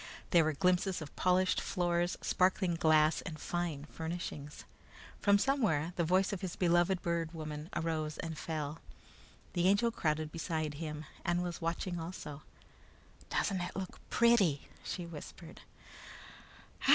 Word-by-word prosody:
There 170 -3 +6
were 155 0 +1
glimpses 180 +4 +2
of 155 -3 -8
polished 185 0 +3
floors, 175 -1 0
sparkling 185 -1 +2
glass, 155 -1 +4
and 155 -4 -7
fine 170 -5 -2
furnishings. 160 -2 -5 0.6
From 200 -1 +5
somewhere, 200 - +1
the 170 - +1
voice 185 +4 +3
of 195 - -4
his 185 -3 -4
beloved 175 +1 +3
Bird 170 -1 -1
Woman 155 0 -5
arose 155 -2 -1
and 165 -1 -4
fell. 155 -1 -4 0.7
The 175 0 +2
Angel 205 +4 +4
crowded 155 -6 -1
beside 160 -2 -2
him 155 -1 -4 0.2
and 175 +1 +1
was 175 0 -4
watching 170 +2 -2
also. 160 -3 -6 0.9
"Doesn't 190 -3 0
it 175 +1 -4
look 190 -1 -5
pretty?" 215 - +4
she 175 - -4
whispered. 165 -3 -10
170 Hz, 135 wpm, -33 LUFS, 155-185 Hz, 0.9 s, There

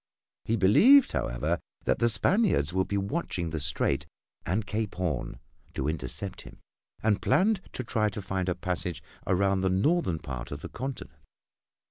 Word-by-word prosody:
He 115 - +1
believed, 215 - +6
however, 75 +8 -1 0.2
that - - +1
the 120 - +3
Spaniards 180 - +2
would 95 0 +1
be 100 - -1
watching 100 - -2
the 80 - -2
Strait 70 -1 0 0.4
and 100 +5 0
Cape 110 -2 -3
Horn 90 -8 -2 0.4
to 65 - -1
intercept 80 +5 -2
him, - - -13 0.5
and 105 -2 +2
planned 190 +9 +3
to 130 - -4
try 110 -2 +1
to 105 - -6
find 95 -1 -2
a 90 - 0
passage 90 -3 -3 0.2
around 95 +1 +2
the 95 - +2
northern 100 - +2
part 65 -5 -7
of - - -6
the - - -6
continent. 130 +1 -6
95 Hz, 160 wpm, -28 LUFS, 80-115 Hz, 0.5 s, believed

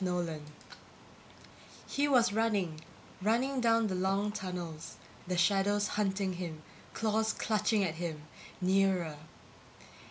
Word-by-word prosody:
NOLAN_ 175 -4 -1 1.5
He 285 +1 +1
was 240 -6 +4
running, 200 -8 0 0.4
running 250 +6 +1
down 230 -1 +4
the 200 - -1
long 195 +3 +1
tunnels, 175 -5 -5 0.3
the 180 0 -1
shadows 200 +3 +3
hunting 195 -2 0
him, 170 -3 -6 0.3
claws 220 0 +1
clutching 215 -1 +1
at 170 -4 0
him, 160 -3 -4 0.4
nearer 185 -4 +2
195 Hz, 105 wpm, -32 LUFS, 175-215 Hz, 1.5 s, was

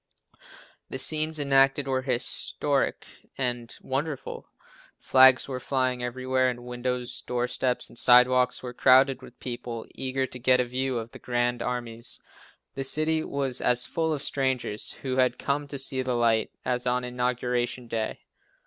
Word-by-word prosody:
The - - -4
scenes 155 0 +3
enacted 135 -1 +3
were 130 -1 0
historic 125 -2 -1 0.3
and 120 -3 -2
wonderful. 140 +2 -4 0.5
Flags 130 -1 +5
were 130 -2 -4
flying 130 -1 -1
everywhere 130 +1 0
and 120 -1 -6
windows, 125 0 -3
doorsteps 125 +1 -1
and - - -4
sidewalks 125 0 +4
were 125 -1 -6
crowded 130 +1 +4
with 125 - -14
people, 120 -2 -5
eager 130 0 -1
to 125 - -9
get 125 +1 +4
a 125 - +2
view 130 +1 -2
of 115 0 -6
the - - -12
grand 120 0 -1
armies. 120 -1 -3 0.5
The 135 - -4
city 155 +3 +1
was 135 -3 -1
as 125 0 +4
full 160 -1 -1
of 145 -3 -2
strangers, 130 -6 -2
who 130 -1 -2
had 130 -1 +2
come 145 +1 -2
to 140 - -6
see 135 -1 +1
the 125 -2 -1
sight, 115 -2 +2 0.2
as 125 -1 -1
on 125 0 +1
Inauguration 125 0 -2
Day. 115 -1 -3
125 Hz, 150 wpm, -26 LUFS, 125-135 Hz, 0.5 s, Flags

